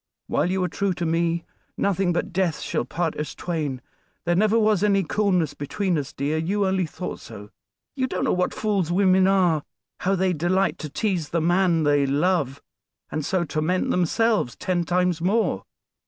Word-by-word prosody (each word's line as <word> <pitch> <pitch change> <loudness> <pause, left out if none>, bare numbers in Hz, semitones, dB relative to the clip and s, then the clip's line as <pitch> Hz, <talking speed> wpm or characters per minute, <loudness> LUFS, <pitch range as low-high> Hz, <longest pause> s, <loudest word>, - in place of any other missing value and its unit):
"While - - 0
you 185 0 0
are - - +1
true 200 +1 -1
to 175 0 -3
me, 165 +1 0 0.3
nothing 195 -2 +1
but 175 +2 -2
death 180 -3 0
shall - - -2
part 165 +4 -2
us 150 - -4
twain. 150 -7 -3 0.4
There 175 - +2
never 215 +4 +3
was 215 -4 +3
any 200 -2 +3
coolness 180 -3 +1
between 180 +6 -2
us, 145 -1 -3
dear; 145 +2 -1
you 195 +5 0
only 190 -2 +1
thought 180 +3 -6
so. 105 +1 -11 0.4
You 260 -2 0
don't 185 - -2
know - - +2
what 180 0 +1
fools 200 -6 -1
women 185 0 +4
are; 180 -5 +3 0.4
how 190 +2 +1
they 185 0 +1
delight 175 +3 +1
to 155 - -5
tease 180 -3 -1
the 170 - 0
man 175 0 +2
they 145 -1 +3
love, 145 -1 0 0.5
and 155 - -2
so 185 +3 0
torment 160 +3 0
themselves 205 - +1
ten 175 -2 -1
times 180 -1 +1
more. 185 - +1
180 Hz, 180 wpm, -24 LUFS, 160-190 Hz, 0.5 s, women